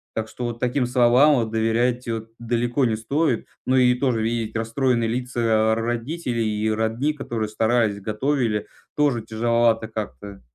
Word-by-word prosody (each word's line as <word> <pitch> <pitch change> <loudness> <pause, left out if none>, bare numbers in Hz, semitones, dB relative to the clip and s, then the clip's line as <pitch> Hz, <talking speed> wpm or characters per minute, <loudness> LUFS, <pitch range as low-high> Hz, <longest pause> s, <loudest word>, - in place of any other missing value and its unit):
Так 110 -1 -2
что 120 +2 -6
вот 120 -1 -4
таким 125 +2 0
словам 125 +4 +5
вот 115 -4 -1
доверять 115 +3 0
вот 115 -1 -4
далеко 120 +2 0
не 115 -2 +1
стоит. 135 +3 -1 0.2
Ну 130 - +2
и 125 -1 +5
тоже 125 -3 0
видеть 115 0 -2
расстроенные 115 +1 0
лица 125 +1 -3
р 110 -1 +2
родителей 120 0 -2
и 110 - +1
родни, 110 +7 0
которые 120 -7 -3
старались, 110 -1 +1
готовили, 110 0 -1 0.3
тоже 145 -6 +2
тяжеловато 115 0 +1
как-то. 100 - -7
115 Hz, 155 wpm, -23 LUFS, 110-125 Hz, 0.3 s, словам